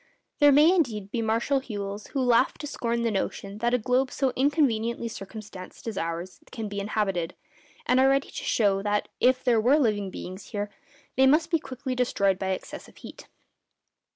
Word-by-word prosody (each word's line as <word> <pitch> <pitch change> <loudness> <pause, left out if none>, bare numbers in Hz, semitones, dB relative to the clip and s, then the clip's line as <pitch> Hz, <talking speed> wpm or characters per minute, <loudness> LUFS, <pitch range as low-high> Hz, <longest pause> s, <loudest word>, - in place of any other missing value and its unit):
There 290 0 +7
may, 300 +5 +6
indeed, 215 - 0
be 235 - -1
Martial 230 +5 +1
Whewells 205 -3 -6
who 275 - -2
laugh 245 0 +3
to 295 - -7
scorn 235 -5 -2
the 230 - +1
notion 200 0 -3
that 240 +2 +2
a - - +3
globe 255 +3 +1
so 265 -1 -1
inconveniently 235 -5 +1
circumstanced 200 -3 -9
as 225 - -3
ours 170 +1 -4
can 225 -3 -5
be 200 0 -4
inhabited, 195 -4 -1 0.5
and 250 +1 +3
are 265 +1 +5
ready 275 0 +1
to - - -6
show 200 -3 +2
that, 205 0 -1
if 255 +1 +3
there 235 -3 +3
were 260 +6 +4
living 210 -8 +1
beings 185 +1 -8
here, 205 -1 -4 0.5
they 265 0 +6
must 310 +4 +3
be 330 - +3
quickly 260 -1 -5
destroyed 200 -6 +1
by 190 - -2
excessive 190 - -6
heat. - - -11
230 Hz, 180 wpm, -26 LUFS, 205-260 Hz, 0.5 s, There